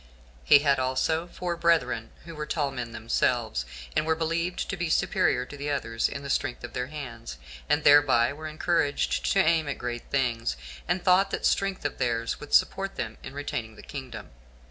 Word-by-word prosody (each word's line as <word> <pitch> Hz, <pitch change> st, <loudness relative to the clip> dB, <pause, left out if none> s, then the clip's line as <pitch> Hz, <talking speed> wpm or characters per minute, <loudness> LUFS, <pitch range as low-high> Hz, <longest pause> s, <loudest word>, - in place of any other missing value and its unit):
He -, -, +8 dB
had 140 Hz, -2 st, +4 dB
also 130 Hz, +6 st, 0 dB
four 175 Hz, 0 st, -4 dB
brethren, 170 Hz, -9 st, +1 dB, 0.2 s
who 165 Hz, -, -8 dB
were 150 Hz, -1 st, -5 dB
tall 145 Hz, -4 st, -1 dB
men 120 Hz, -3 st, -5 dB
themselves, 115 Hz, -, 0 dB, 0.3 s
and -, -, +3 dB
were 160 Hz, +1 st, +1 dB
believed 165 Hz, +2 st, -1 dB
to -, -, -2 dB
be 175 Hz, -2 st, -2 dB
superior 125 Hz, -5 st, +2 dB
to 145 Hz, +2 st, -6 dB
others 115 Hz, -5 st, 0 dB
in 140 Hz, -, -6 dB
the 140 Hz, -, -6 dB
strength 125 Hz, -3 st, -1 dB
of 120 Hz, -, -7 dB
their 125 Hz, 0 st, -2 dB
hands, 120 Hz, -, -7 dB, 0.3 s
and -, -, +2 dB
thereby 140 Hz, -4 st, +6 dB
were 155 Hz, +2 st, -7 dB
encouraged 145 Hz, -, 0 dB
to -, -, +3 dB
aim 160 Hz, -2 st, +3 dB
at 140 Hz, -, -3 dB
great 120 Hz, -1 st, -4 dB
things, 115 Hz, -, 0 dB, 0.3 s
and 175 Hz, +1 st, 0 dB
thought 190 Hz, +2 st, +4 dB
that -, -, -3 dB
strength 195 Hz, -5 st, +1 dB
of 145 Hz, -, -2 dB
theirs 115 Hz, -1 st, -1 dB
would 150 Hz, -, 0 dB
support 195 Hz, 0 st, +2 dB
them 110 Hz, -1 st, -5 dB
in 130 Hz, -, -9 dB
retaining 120 Hz, -6 st, -4 dB
the -, -, -13 dB
kingdom. 130 Hz, -, -8 dB
140 Hz, 190 wpm, -27 LUFS, 120-160 Hz, 0.3 s, He